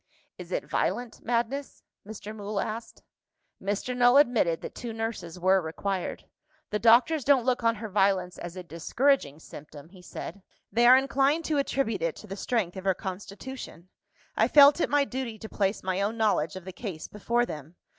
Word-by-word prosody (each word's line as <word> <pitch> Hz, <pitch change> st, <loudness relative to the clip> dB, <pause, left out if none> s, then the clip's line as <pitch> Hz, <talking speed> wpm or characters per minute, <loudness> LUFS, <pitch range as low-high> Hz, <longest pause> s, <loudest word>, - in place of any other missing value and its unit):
"Is -, -, -9 dB
it -, -, -2 dB
violent 245 Hz, -2 st, -2 dB
madness?" 245 Hz, +4 st, -2 dB, 0.2 s
Mr. 215 Hz, 0 st, -8 dB
Mool 205 Hz, -1 st, -4 dB
asked. 220 Hz, +3 st, -5 dB, 0.6 s
Mr. 205 Hz, +6 st, -2 dB
Null 245 Hz, +1 st, +5 dB
admitted 235 Hz, -, +3 dB
that -, -, -7 dB
two 235 Hz, -2 st, -6 dB
nurses 225 Hz, -6 st, -5 dB
were 190 Hz, +1 st, +4 dB
required. 180 Hz, +3 st, -4 dB, 0.5 s
"The 210 Hz, -, 0 dB
doctors 245 Hz, +7 st, +5 dB
don't 270 Hz, -3 st, +4 dB
look 250 Hz, -2 st, +1 dB
on 230 Hz, 0 st, +3 dB
her 220 Hz, +1 st, -6 dB
violence 195 Hz, -3 st, +1 dB
as 175 Hz, +1 st, -7 dB
a 185 Hz, -, -7 dB
discouraging 170 Hz, -, 0 dB
symptom," 150 Hz, -1 st, -12 dB
he 185 Hz, 0 st, -15 dB
said. 195 Hz, +2 st, -8 dB, 0.3 s
"They 235 Hz, +4 st, +4 dB
are 255 Hz, +1 st, +9 dB
inclined 275 Hz, +4 st, +1 dB
to 300 Hz, -2 st, +1 dB
attribute 270 Hz, -5 st, -1 dB
it 165 Hz, -1 st, -1 dB
to -, -, -12 dB
the 195 Hz, -, -6 dB
strength 205 Hz, -4 st, -1 dB
of 190 Hz, -, -7 dB
her 190 Hz, -1 st, +2 dB
constitution. 195 Hz, -1 st, -8 dB, 0.5 s
I -, -, +3 dB
felt 290 Hz, +3 st, +7 dB
it -, -, +1 dB
my 290 Hz, -1 st, +3 dB
duty 255 Hz, -4 st, -5 dB
to 220 Hz, -, -8 dB
place 200 Hz, -1 st, -1 dB
my 185 Hz, +1 st, -1 dB
own 210 Hz, +3 st, -1 dB
knowledge 210 Hz, -7 st, +1 dB
of 185 Hz, -1 st, -8 dB
the 190 Hz, -, -7 dB
case 180 Hz, -6 st, -6 dB
before 235 Hz, +3 st, 0 dB
them. 155 Hz, -, -8 dB
215 Hz, 185 wpm, -27 LUFS, 185-245 Hz, 0.6 s, are